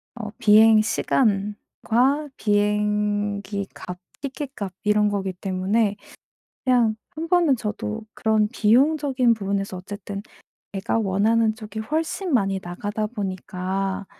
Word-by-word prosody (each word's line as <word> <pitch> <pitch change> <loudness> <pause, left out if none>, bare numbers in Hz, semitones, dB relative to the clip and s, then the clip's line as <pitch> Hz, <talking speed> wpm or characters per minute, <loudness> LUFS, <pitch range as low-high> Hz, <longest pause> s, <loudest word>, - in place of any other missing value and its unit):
어 215 -3 -6
비행 220 -1 +6
시간과 225 +6 0
비행기 205 -1 0
값, 180 0 -7 0.2
티켓 275 0 -5
값 195 -3 -5
이런 210 0 +3
거기 195 -2 -1
때문에 195 +3 0 0.7
그냥 240 -4 +3 0.2
1 325 +1 -4
번은 340 -6 +4
저도 205 - -4
그런 220 -1 +2
비용적인 255 +2 +3
부분에서 195 -2 -2
어쨌든 200 +1 -7 0.5
내가 195 +3 -1
원하는 220 +2 +2
쪽이 220 -1 -8
훨씬 320 - -2
많이 195 -4 +1
나가다 205 +5 -3
보니까 190 -2 -3
210 Hz, 235 characters per minute, -23 LUFS, 200-230 Hz, 0.7 s, 비행